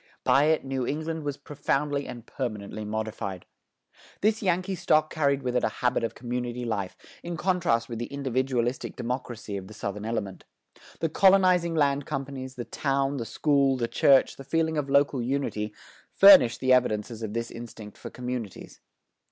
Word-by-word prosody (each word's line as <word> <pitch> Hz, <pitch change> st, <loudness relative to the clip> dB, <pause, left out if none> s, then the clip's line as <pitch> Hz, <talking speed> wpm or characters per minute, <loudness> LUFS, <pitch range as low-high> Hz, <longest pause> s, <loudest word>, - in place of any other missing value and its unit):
By 140 Hz, +2 st, +4 dB
it 155 Hz, -2 st, +2 dB
New 135 Hz, -2 st, -2 dB
England 160 Hz, +2 st, -3 dB
was 145 Hz, -1 st, -3 dB
profoundly 145 Hz, 0 st, -2 dB
and 120 Hz, -1 st, -8 dB
permanently 110 Hz, -5 st, -5 dB
modified. 105 Hz, -3 st, -4 dB, 0.8 s
This 215 Hz, +1 st, +2 dB
Yankee 185 Hz, 0 st, 0 dB
stock 155 Hz, -4 st, +2 dB
carried 140 Hz, -3 st, +1 dB
with 125 Hz, -1 st, -2 dB
it 125 Hz, -, +2 dB
a -, -, +2 dB
habit 125 Hz, -1 st, +2 dB
of 115 Hz, -, -2 dB
community 120 Hz, 0 st, -4 dB
life, 100 Hz, -5 st, -3 dB, 0.2 s
in 170 Hz, -1 st, -5 dB
contrast 155 Hz, -11 st, +1 dB
with 115 Hz, -1 st, -6 dB
the 120 Hz, -, -3 dB
individualistic 130 Hz, -2 st, -1 dB
democracy 120 Hz, -4 st, -4 dB
of 95 Hz, -1 st, -8 dB
the 105 Hz, -, -12 dB
Southern 105 Hz, -1 st, -5 dB
element. 105 Hz, -4 st, -4 dB, 0.6 s
The 165 Hz, -, +1 dB
colonizing 185 Hz, -1 st, +4 dB
land 140 Hz, -2 st, +1 dB
companies, 135 Hz, -2 st, -5 dB
the 120 Hz, -2 st, -5 dB
town, 135 Hz, 0 st, -1 dB
the 115 Hz, -, -3 dB
school, 140 Hz, +2 st, +2 dB
the 120 Hz, -2 st, -1 dB
church, 135 Hz, +2 st, +4 dB
the 135 Hz, -, -9 dB
feeling 160 Hz, +3 st, 0 dB
of 145 Hz, -2 st, -2 dB
local 140 Hz, -2 st, +3 dB
unity, 120 Hz, -4 st, -2 dB, 0.4 s
furnished 190 Hz, -12 st, +8 dB
the 130 Hz, 0 st, +4 dB
evidences 115 Hz, -2 st, +1 dB
of 110 Hz, -1 st, -5 dB
this 115 Hz, 0 st, -3 dB
instinct 115 Hz, -3 st, -9 dB
for -, -, -9 dB
communities. 125 Hz, -5 st, -6 dB
130 Hz, 165 wpm, -27 LUFS, 115-145 Hz, 0.8 s, furnished